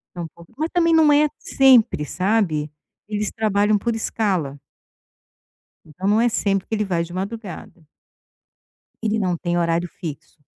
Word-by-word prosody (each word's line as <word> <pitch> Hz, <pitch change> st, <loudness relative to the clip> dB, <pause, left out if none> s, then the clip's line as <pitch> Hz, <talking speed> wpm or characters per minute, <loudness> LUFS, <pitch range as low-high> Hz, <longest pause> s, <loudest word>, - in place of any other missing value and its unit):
Não 175 Hz, -, -4 dB
é -, -, -5 dB
pouco 170 Hz, 0 st, -17 dB
mas 315 Hz, +1 st, -1 dB
também 335 Hz, -2 st, +3 dB
não 310 Hz, -2 st, +5 dB
é 300 Hz, +1 st, +4 dB
sempre, 250 Hz, -, +4 dB
sabe. 175 Hz, -3 st, 0 dB, 0.4 s
Eles 210 Hz, -1 st, -2 dB
trabalham 210 Hz, -1 st, +1 dB
por 235 Hz, +2 st, -1 dB
escala. 185 Hz, -11 st, -2 dB, 1.3 s
Então 180 Hz, +5 st, -7 dB
não 215 Hz, +2 st, +3 dB
é 240 Hz, -, +4 dB
sempre 195 Hz, -3 st, 0 dB
que 225 Hz, -, -3 dB
ele 210 Hz, -1 st, 0 dB
vai 175 Hz, -3 st, -1 dB
de 175 Hz, -, -11 dB
madrugada. 195 Hz, -3 st, -7 dB, 1.2 s
Ele 220 Hz, 0 st, 0 dB
não 180 Hz, -4 st, 0 dB
tem 175 Hz, +1 st, -2 dB
horário 170 Hz, +1 st, 0 dB
fixo. 155 Hz, -2 st, -8 dB
200 Hz, 155 wpm, -21 LUFS, 170-225 Hz, 1.3 s, não